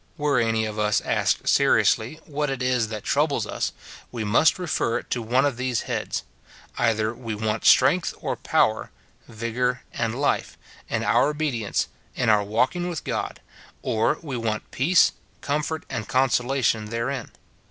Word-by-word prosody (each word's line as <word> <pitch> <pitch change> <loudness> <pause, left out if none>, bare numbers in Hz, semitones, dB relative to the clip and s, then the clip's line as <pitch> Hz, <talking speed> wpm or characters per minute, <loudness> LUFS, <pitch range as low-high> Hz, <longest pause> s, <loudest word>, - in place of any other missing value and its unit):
Were 145 -4 +2
any 115 -1 +1
of 110 0 -5
us 105 -2 +2
asked - - 0
seriously, 125 +9 +3
what 150 -1 -2
it 135 -2 -3
is 125 -3 +1
that 110 -1 -6
troubles - - +1
us, - - -2 0.4
we 115 -3 -4
must 115 - +4
refer 165 -9 0
it - - -9
to 120 - 0
one 125 +5 +2
of 140 -4 0
these 125 -2 -1
heads: - - -3 0.3
— - - -23
either 110 0 +1
we 115 -2 -5
want 110 +1 -2
strength 145 +7 +5
or - - -2
power, 110 0 +1 0.4
vigour 120 +3 -2
and 115 +2 -2
life, 145 - 0 0.3
in - - -1
our 115 +6 +3
obedience, 150 -8 -1 0.3
in 125 -3 +1
our 105 -1 +5
walk 110 - +1
ing 175 0 -2
with 170 -4 -4
God; - - -3 0.4
or 115 +4 +1
we 140 -5 -4
want 110 -2 -3
peace, 170 +7 +4 0.3
comfort, 150 +2 -2
and 115 -5 -5
consola 130 0 +1
tion 110 -1 +2
therein. 115 +3 -3
120 Hz, 165 wpm, -24 LUFS, 110-140 Hz, 0.4 s, strength